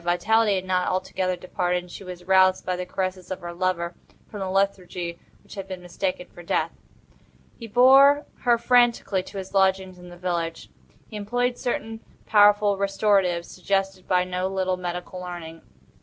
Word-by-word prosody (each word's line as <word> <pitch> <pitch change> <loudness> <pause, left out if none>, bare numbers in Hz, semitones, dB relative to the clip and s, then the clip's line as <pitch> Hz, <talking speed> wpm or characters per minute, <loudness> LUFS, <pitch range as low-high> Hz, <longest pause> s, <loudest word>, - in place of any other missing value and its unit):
Vitality 205 +5 +2
had 185 0 -3
not 185 -1 0
altogether 185 0 -1
departed, 180 0 -2
and 180 - -15
she - - -9
was 180 -1 -9
aroused 185 0 +4
by 185 - -1
the 180 0 -5
caresses 185 0 -4
of 185 - -5
her 175 0 -6
lover 175 -1 -1 0.3
from 210 - -8
the 190 -1 -3
lethargy 185 -3 -1 0.2
which - - -14
had 195 -2 -7
been 185 -1 -6
mistaken 180 0 -4
for 175 - -11
death. 170 - -1 0.9
He 230 - -7
bore 270 +5 +6
her 240 -1 +3
frantically 235 -5 +3
to 190 - -10
his 190 0 -7
lodgings 190 -1 +1
in 180 0 -12
the 175 - -12
village. 170 -2 -3 0.4
He 220 - -11
employed 245 +4 -1
certain 240 -3 -3 0.3
powerful 205 -1 +4
restoratives 195 -3 +1
suggested 195 0 -2
by 180 -1 +3
no 180 0 -2
little 190 -1 -1
medical 180 0 -5
learning. 175 -2 -8
185 Hz, 170 wpm, -24 LUFS, 180-200 Hz, 0.9 s, bore